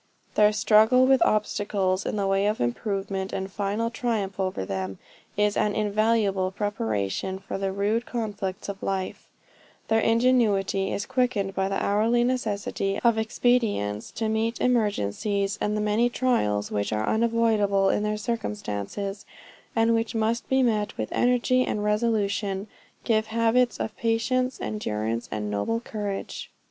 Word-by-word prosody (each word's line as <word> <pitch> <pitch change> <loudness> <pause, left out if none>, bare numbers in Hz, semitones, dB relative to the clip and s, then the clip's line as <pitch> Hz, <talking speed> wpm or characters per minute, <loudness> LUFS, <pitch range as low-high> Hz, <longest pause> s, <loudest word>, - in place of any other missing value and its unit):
Their 210 0 +5
struggle 220 +4 +5
with 265 -2 +4
obstacles 205 -2 0
in - - -2
the 200 -1 0
way 195 +1 +2
of 210 +1 0
improvement, 195 - -2
and 190 0 -4
final 205 +4 -1
triumph 215 -6 -2
over 185 - -1
them, 95 0 -4 0.4
is 210 0 +2
an 210 -1 +1
invaluable 210 -2 +1
preparation 190 - -2
for 195 0 -6
the 195 -1 -1
rude 210 +4 0
conflicts 205 -5 -4
of 200 -1 -6
life; 190 -1 -3 0.6
their 225 - +4
ingenuity 225 -5 +2
is 200 - -2
quickened 230 -7 0
by 190 0 0
the 195 - -1
hourly 225 +4 +2
necessity 205 -5 -1
of 235 -2 +4
expedients 220 - 0
to 225 - -2
meet 220 +2 -1
emergencies, 205 - 0
and 210 0 0
the - - 0
many 215 +3 +2
trials 105 - 0
which 100 +1 -1
are 110 0 0
unavoidable 220 -4 +2
in - - +1
their 210 0 -1
circumstances, 205 - -4 0.5
and 225 0 +3
which 225 0 -1
must 225 +1 0
be 265 0 +3
met 210 -3 0
with 110 - -3
energy 250 +1 +2
and 210 - -2
resolution, 210 -2 0 0.4
give 220 -2 +1
habits 230 +1 +2
of 220 - -3
patient 250 +3 0
endurance, 115 - -3
and 105 -1 -3
noble 105 - -1
courage. 205 -4 -5
210 Hz, 145 wpm, -26 LUFS, 195-230 Hz, 0.6 s, Their